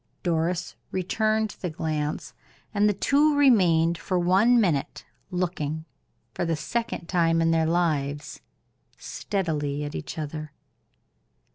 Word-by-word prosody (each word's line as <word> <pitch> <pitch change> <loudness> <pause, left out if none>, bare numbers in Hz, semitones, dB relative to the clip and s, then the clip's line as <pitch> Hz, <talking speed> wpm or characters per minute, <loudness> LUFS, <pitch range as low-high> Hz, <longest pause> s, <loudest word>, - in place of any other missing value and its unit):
Doris 170 +1 -1
returned 215 +3 0
the 180 - -2
glance, 155 -1 -3 0.4
and 210 0 +3
the - - +2
two 290 +7 +3
remained 175 - +4
for 185 - -1
one 195 +8 +4
minute 165 -10 0 0.2
looking, 160 -4 -2 0.5
for - - -2
the 165 -1 0
second 175 +5 -3
time 165 -2 +2
in 165 0 +3
their 160 -1 +2
lives, 155 -3 -1 0.6
steadily 150 -7 -2
at 145 0 -5
each 140 - -6
other. 155 -1 -5
170 Hz, 120 wpm, -26 LUFS, 155-195 Hz, 0.6 s, remained